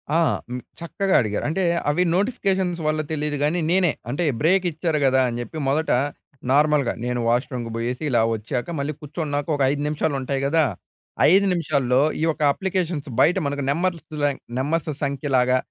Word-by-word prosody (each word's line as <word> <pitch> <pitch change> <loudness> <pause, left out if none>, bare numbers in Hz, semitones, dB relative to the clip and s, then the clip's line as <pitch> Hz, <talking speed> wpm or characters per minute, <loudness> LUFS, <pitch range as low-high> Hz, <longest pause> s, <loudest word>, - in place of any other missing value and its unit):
ఆ! - - +5 0.3
హ్మ్. 125 0 -4 0.2
చక్కగా 190 +3 -1
అడిగారు. 105 -3 -2
అంటే, 190 +4 -1 0.3
అవి 155 +5 +2
నోటిఫికేషన్స్ 190 -4 0
వల్ల 155 0 +1
తెలీదు 150 -1 -2
గానీ, 155 +4 +1
నేనే, 180 -3 +3 0.2
అంటే 145 +8 -1 0.2
బ్రేక్ 185 +4 +3
ఇచ్చారు 160 -1 -1
కదా, 130 0 +4
అని 120 0 -4
చెప్పి. 120 +6 -7
మొదట 155 +4 +1 0.6
నార్మల్‍గ 145 -2 +3 0.2
నేను 125 0 -1
వాష్ 120 +3 +2
రూమ్‌కి 120 -3 -4
పోయేసి 120 +5 -3
ఇలా 120 -4 +3
వచ్చాక 120 +6 -4
మళ్ళీ 140 +2 -2
కూర్చున్నాక 145 -1 -3
ఒక 145 - -3
5 145 0 -2
నిమిషాలు 150 0 -1
ఉంటాయి 135 +1 -2
కదా! 160 +2 +3 0.7
5 195 +2 +5
నిమిషాల్లో 140 -6 +1 0.2
ఈ - - +1
యొక్క 155 -1 -1
అప్లికేషన్స్ 180 -5 -2
బయట 175 +7 +4
మనకు 140 0 -2
నెంబర్తులే 155 -2 -1 0.3
నెంబర్స్ 155 +5 -1
సంఖ్యలాగా, 135 -3 +1
150 Hz, 160 wpm, -23 LUFS, 130-170 Hz, 0.7 s, ఆ